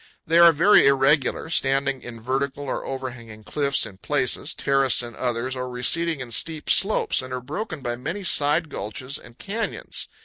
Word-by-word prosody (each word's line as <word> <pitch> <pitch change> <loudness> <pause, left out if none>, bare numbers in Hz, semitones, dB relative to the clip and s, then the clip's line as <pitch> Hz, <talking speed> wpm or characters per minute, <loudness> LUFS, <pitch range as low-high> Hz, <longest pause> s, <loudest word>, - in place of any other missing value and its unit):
They 165 +2 +3
are 170 0 +9
very 170 +1 +5
irregular, 140 +2 +2
standing 135 -2 0
in 115 -1 -9
vertical 135 +4 -2
or 135 - -3
overhanging 120 -5 -7
cliffs 140 +3 0
in 95 -2 -12
places, 145 +3 -1
terraced 135 -3 +2
in 120 -1 -8
others, 125 +1 -2
or 125 0 -4
receding 150 +5 +1
in 125 -2 -7
steep 155 +5 0
slopes, 200 -7 +2
and 130 0 -9
are 130 - -3
broken 155 - -6
by 120 -2 -3
many 170 +11 -5
side 155 -1 +3
gulches 130 +7 -4
and 120 0 -16
canyons. 215 +3 -5
135 Hz, 170 wpm, -23 LUFS, 125-155 Hz, -, are